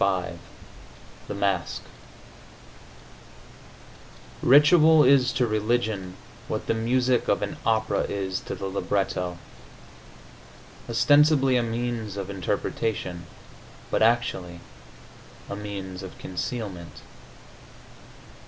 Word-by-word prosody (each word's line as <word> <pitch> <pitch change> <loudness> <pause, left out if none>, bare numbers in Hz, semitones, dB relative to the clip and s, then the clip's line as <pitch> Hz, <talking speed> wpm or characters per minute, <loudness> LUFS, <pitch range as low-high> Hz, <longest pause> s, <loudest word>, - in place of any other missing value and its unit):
XLV 90 -3 0 0.9
THE 105 - -5
MASK 100 -4 -1 2.6
Ritual 155 +3 +6
is 130 -1 +5
to 125 -1 +2
religion 110 -4 -1 0.3
what - - -3
the - - +1
music 125 +2 +1
of - - +1
an - - -4
opera 110 -1 +1
is 95 -2 -2
to - - -6
the - - -6
libretto: 95 -2 -2 1.5
ostensibly 145 +2 +4
a 125 - +3
means 115 -3 -3
of 100 0 -4
interpretation, 95 -2 -3 0.6
but - - +1
actually 110 -7 +1 0.9
a 100 - -5
means 100 -2 -6
of 95 -2 -9
concealment. 95 -4 -6
105 Hz, 90 wpm, -25 LUFS, 95-120 Hz, 2.6 s, Ritual